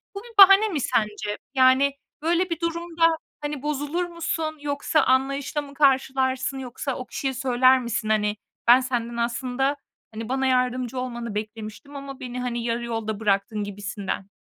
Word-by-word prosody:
bu 400 - -5
bir 475 -1 -14
bahane 395 +2 +9
mi 330 -9 -2
sence? 210 -2 -1 0.2
Yani, 265 +1 +4 0.3
böyle 345 +3 +1
bir 335 -2 -3
durumda, 335 -1 +1 0.2
hani, 295 -2 -4
bozulur 295 +4 -2
musun 325 -2 -3
yoksa 290 +2 +1
anlayışla 275 +3 +1
mı 285 -1 -11
karşılarsın? 265 -1 +1
Yoksa 260 +1 -4
o 255 - -6
kişiye 270 -1 -3
söyler 255 0 +4
misin? 235 -2 -3
"Hani, 210 -1 +1 0.3
ben 245 +2 +8
senden 240 -2 -3
aslında, 250 +4 -1 0.4
hani, 225 +1 -6
bana 265 +1 +1
yardımcı 255 -1 0
olmanı 240 -3 -5
beklemiştim 215 +6 -6
ama 275 -1 -8
beni, 250 0 -6
hani, 240 -1 -2
yarı 235 0 -1
yolda 220 -3 -3
bıraktın." 205 0 0
gibisinden. 200 -1 -5
260 Hz, 155 wpm, -24 LUFS, 235-290 Hz, 0.4 s, bahane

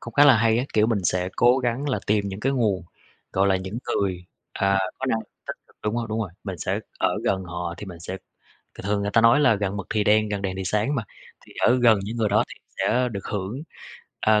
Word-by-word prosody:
cũng 115 - -9
khá 145 - +7
là 140 -4 +8
hay 115 0 +3
á! 125 - 0
Kiểu 110 0 +4
mình 115 -2 +1
sẽ 90 +1 +1
cố 125 +2 +5
gắng 130 +3 -1
là 130 - 0
tìm 100 -1 +1
những 95 +1 -6
cái 135 +4 +1
nguồn, 105 -8 +1 0.5
gọi 95 +1 +3
là, 95 - +3
những 95 +5 -5
người, 90 -3 -1 0.3
à, 100 0 +2 0.2
có 135 - -3
năng 115 - +1
lượng - - -10 0.2
tích - - -4
cực. - - -27
Đúng 105 - 0
rồi, 120 -1 -1
đúng 110 +1 -1
rồi, 105 -5 -3
mình 95 -4 -5
sẽ - - -1 0.2
ở - - +1
gần 95 -1 0
họ 85 0 -4
thì 105 - -8
mình 85 -3 -9
sẽ 90 +3 -5 0.6
thường - - -10
thường 100 0 +1
người 100 - -1
ta 115 - +4
nói 115 +5 +6
là 130 -6 +5
gần 100 -1 -2
mực 100 -3 -5
thì 105 -1 +1
đen, 110 +1 +4
gần 100 -1 -3
đèn 95 -1 -2
thì 95 - -3
sáng 105 +9 0
mà, 125 - 0 0.4
thì - - -15
ở 125 +1 +5
gần 115 -3 +6
những 110 +4 -5
người 110 -2 +1
đó 105 +1 +3
thì - - -9 0.2
sẽ 125 0 +2
được 100 -2 -5
hưởng, 105 +7 -4 0.6
ờ, 110 0 +4
105 Hz, 265 wpm, -24 LUFS, 95-115 Hz, 0.6 s, là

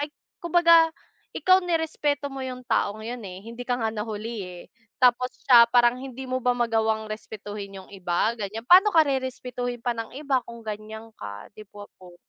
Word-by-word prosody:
ay 290 - -1 0.4
kumbaga 335 -1 +6 0.5
ikaw 370 0 +5
nirespeto 295 -4 -1
mo 270 -1 -6
yung 255 0 -7
taong 215 -2 0
yun 235 +2 -6
eh, 185 +1 -9
hindi 235 +2 -8
ka 245 -1 -1
nga 220 - +1
nahuli 220 +1 -5
eh. 180 -1 -10 0.4
Tapos 250 0 +4
siya 240 -3 +8
parang 240 0 +4
hindi 265 0 -8
mo 255 - 0
ba 250 0 +2
magawang 220 -2 0
respetuhin 205 -2 -7
yung - - -19
iba, 185 +3 0
ganyan, 215 +2 -5
paano 385 +3 +7
ka 325 - +7
rerespetuhin 250 -3 -3
pa 245 - 0
ng 225 +1 -6
iba 275 -3 0
kung 235 -1 -10
ganyan 220 +1 -7
ka, 100 0 -8
'di 215 +1 -13
ba 205 0 -9
po? 180 -1 -14
235 Hz, 180 wpm, -25 LUFS, 215-260 Hz, 0.5 s, siya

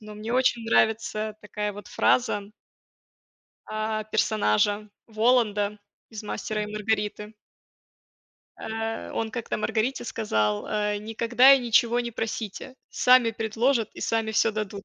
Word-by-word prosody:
но 215 0 -10
мне 215 +2 -5
очень 250 -2 +2
нравится 220 -1 +1
такая 210 0 -4
вот 205 +1 -10
фраза. 240 -5 +1 1.2
А, 215 0 -2
персонажа 210 - +1 0.2
Воланда 215 -2 +1 0.3
из 220 -2 -8
"Мастера 210 0 -3
и - - -3
Маргариты". 210 0 -2 1.2
Э, 225 0 -4
он 225 -1 -2
как-то 235 0 -4
Маргарите 220 +4 -1
сказал: 105 - -1
"Э, 210 -1 -1
никогда 230 +5 +4
и 275 - +6
ничего 235 0 +3
не 240 0 -4
просите. 225 +2 -5
Сами 250 -2 +4
предложат 225 +1 0
и - - -10
сами 225 -1 0
всё 225 - +3
дадут." 210 -2 -5
220 Hz, 125 wpm, -26 LUFS, 210-230 Hz, 1.2 s, и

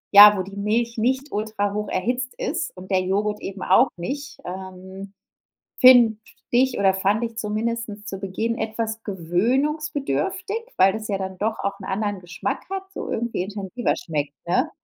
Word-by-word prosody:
ja, 205 0 +11
wo 185 - -1
die 195 +1 -10
Milch 230 +3 0
nicht 260 +5 0
ultrahocherhitzt 210 +3 -2
ist 325 0 -3
und 185 +2 -10
der 190 -1 +3
Joghurt 205 +3 -1
eben 195 0 -6
auch 240 +8 +5
nicht. 275 +10 -5
Ähm, 190 +1 -8 0.7
finde 245 -4 +8 0.3
ich 255 +1 +3
oder 195 -1 +4
fand 200 +4 +1
ich 230 -1 -5
zumindest 215 0 -3
zu 195 -1 -5
Beginn 220 +4 -2
etwas 220 0 -3
gewöhnungsbedürftig, 265 - -1 0.2
weil 190 +1 +5
das 220 0 -5
ja 200 -2 0
dann 190 -1 -5
doch 220 +2 -1
auch 200 - -2
'nen 190 - -6
anderen 205 0 -1
Geschmack 175 0 -4
hat, 385 0 -3
so - - -5
irgendwie 230 -4 -1
intensiver 205 +4 -2
schmeckt, 150 -3 -3
ne? 175 - +1
210 Hz, 160 wpm, -23 LUFS, 190-235 Hz, 0.7 s, ja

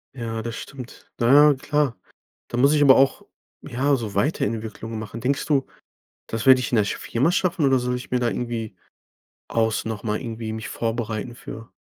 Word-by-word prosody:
Ja, 115 -3 -4
das 115 0 -5
stimmt. 130 -3 -10
Na 120 +2 +3 0.2
ja, - - +3
klar. 145 -2 0 0.5
Da - - -4
muss 140 +4 +4
ich 150 - +3
aber 135 -2 +8
auch, 135 0 +3 0.4
ja, 140 +4 +1
so 110 -6 -4
Weiterentwicklungen 110 -2 -2
machen. 110 +1 -7
Denkst 135 +3 -1
du, 140 -3 +1 0.6
das 115 0 -4
werde 130 -1 +8
ich 125 -3 -3
in - - +2
der 110 - +4
sch - - -3
Firma 135 +9 0
schaffen? 180 -3 +1
Oder, 135 -1 +4
soll 125 0 -1
ich 125 - -8
mir 125 - +2
da 120 - +1
irgendwie 115 -3 -3 0.7
aus 110 -1 0
nochmal 110 -1 -3
irgendwie 115 -2 -5
mich 110 0 -6
vorbereiten 115 0 -3
für? 115 -1 -10
120 Hz, 185 wpm, -23 LUFS, 110-135 Hz, 0.7 s, aber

